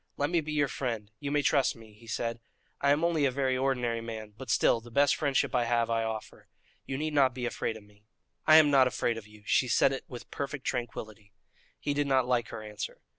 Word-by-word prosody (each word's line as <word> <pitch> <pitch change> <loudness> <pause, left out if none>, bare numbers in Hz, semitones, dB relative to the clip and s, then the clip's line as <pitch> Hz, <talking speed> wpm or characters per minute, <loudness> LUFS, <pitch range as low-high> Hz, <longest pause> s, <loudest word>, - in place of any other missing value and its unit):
"Let 145 +3 0
me 170 -2 +2
be 155 0 -6
your 145 -2 +2
friend; 115 -6 -4
you 145 - -4
may 145 0 +1
trust 135 0 +2
me," 110 -2 -15
he 115 +2 -18
said. 115 +1 -3 0.4
"I 140 - +3
am 145 +3 +3
only 165 -4 +2
a - - +4
very 130 0 0
ordinary 125 -3 0
man; 110 -2 -7
but 130 +3 -10
still, 115 - +3
the 120 - -13
best 140 +4 +3
friendship 140 -3 0
I 125 -2 +2
have 115 -1 +1
I 115 0 +1
offer. 110 -1 -6 0.4
You 135 - -3
need 155 +1 -2
not 135 -3 +3
be 125 -2 -3
afraid 115 -1 -2
of 110 - -14
me." 105 +1 -24 0.4
"I 155 - +8
am 155 -2 +7
not 135 -2 +6
afraid 120 -2 -1
of 105 - -15
you." 105 0 -17
She 125 - +2
said 135 +3 +3
it 135 - -5
with 120 - -10
perfect 140 -1 -5
tranquillity. 110 -4 -5 0.5
He 145 - -1
did 145 0 0
not 130 -2 +2
like 120 -2 +1
her 110 - -7
answer. 105 -1 -7
125 Hz, 235 wpm, -29 LUFS, 115-140 Hz, 0.5 s, I